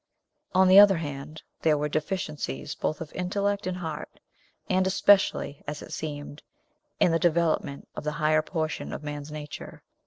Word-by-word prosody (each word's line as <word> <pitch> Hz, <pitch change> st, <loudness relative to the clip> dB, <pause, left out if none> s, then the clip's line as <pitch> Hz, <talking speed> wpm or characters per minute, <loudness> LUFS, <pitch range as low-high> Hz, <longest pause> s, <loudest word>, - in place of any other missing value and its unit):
On 190 Hz, 0 st, +6 dB
the 190 Hz, +2 st, +9 dB
other 200 Hz, -3 st, +8 dB
hand, 150 Hz, 0 st, -6 dB, 0.2 s
there 155 Hz, -2 st, +3 dB
were 150 Hz, +1 st, 0 dB
deficiencies 150 Hz, -, -3 dB
both 155 Hz, -, -3 dB
of 160 Hz, -, -7 dB
intellect 200 Hz, +2 st, -1 dB
and 185 Hz, -1 st, -2 dB
heart, 160 Hz, -4 st, -6 dB, 0.5 s
and 185 Hz, 0 st, +2 dB
especially, 190 Hz, -6 st, +3 dB
as 150 Hz, +1 st, -5 dB
it -, -, -9 dB
seemed, 145 Hz, -1 st, -6 dB, 0.6 s
in 175 Hz, -, +4 dB
the 165 Hz, -, +2 dB
development 165 Hz, -4 st, +1 dB
of -, -, -5 dB
the 150 Hz, 0 st, -2 dB
higher 155 Hz, -1 st, +3 dB
portion 155 Hz, -1 st, -3 dB
of -, -, -6 dB
man's 145 Hz, 0 st, -6 dB
nature. 150 Hz, -1 st, -8 dB
155 Hz, 160 wpm, -27 LUFS, 150-185 Hz, 0.6 s, the